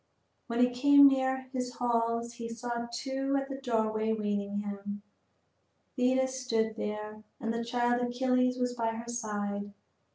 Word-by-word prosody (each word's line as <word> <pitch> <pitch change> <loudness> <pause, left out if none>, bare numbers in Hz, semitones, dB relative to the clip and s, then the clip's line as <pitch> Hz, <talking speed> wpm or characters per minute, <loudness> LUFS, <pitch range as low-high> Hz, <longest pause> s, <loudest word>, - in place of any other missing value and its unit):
When 235 0 0
he 245 0 +5
came 285 +3 +7
near 265 -1 +1
his 250 -1 -2
hall 230 -1 +1
he 235 -1 -7
saw 235 0 -4
two 270 +2 -1
at 275 0 -5
the 270 0 -6
doorway 220 -3 0
awaiting 205 -2 -1
him. 205 0 -6 0.9
Thetis 260 +1 +1
stood 225 -3 0
there, 210 0 -5 0.2
and 230 -3 -2
the 235 0 -2
child 240 +1 +1
Achilles 250 +1 +1
was 250 -1 0
by 230 -2 -1
her 230 +1 -7
side. 205 -3 -3
235 Hz, 150 wpm, -30 LUFS, 220-255 Hz, 0.9 s, came